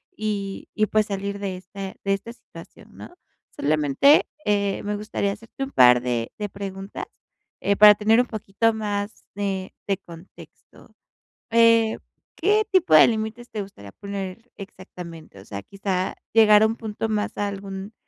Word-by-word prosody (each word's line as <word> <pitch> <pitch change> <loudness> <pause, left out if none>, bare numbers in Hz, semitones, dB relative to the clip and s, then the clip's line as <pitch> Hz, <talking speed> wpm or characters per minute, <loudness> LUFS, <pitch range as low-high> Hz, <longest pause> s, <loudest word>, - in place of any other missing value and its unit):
y 205 -2 -4
y 215 - +2
pues 215 0 +1
salir 200 0 -4
de 190 -2 -4
este 190 +1 -8
de 195 0 +1
esta 200 +4 -5
situación, - - -15
¿no? - - -11 0.4
Solamente, 150 - +3 0.2
eh, 200 -1 0
me 205 0 -2
gustaría 205 -1 -2
hacerte 230 +5 -8
un 270 - -5
par 125 -1 +6
de 120 -2 -2
de 210 -1 -3
preguntas, 195 0 -7 0.6
eh, 200 - +2
para 210 0 +9
tener 220 +3 +3
un 250 - -4
poquito 220 +1 0
más 205 -1 -4
de, 195 -2 -3
de 195 -2 +1
contexto. 170 -1 -16 0.6
Eh, 230 -1 +4 0.4
¿qué 420 +4 +2
tipo 370 - +3
de 155 - +9
límites 225 +1 -3
te 215 -2 -4
gustaría 100 - -11
poner 200 - -7
exactamente? 175 - -11
O - - -16
sea, 100 -1 -6
quizá 195 -2 -3 0.2
llegar 215 -2 +7
a - - +5
un 225 - -2
punto 220 0 -4
más 210 -1 -2
a 205 - 0
algún 195 +1 -7
200 Hz, 160 wpm, -23 LUFS, 190-220 Hz, 0.6 s, para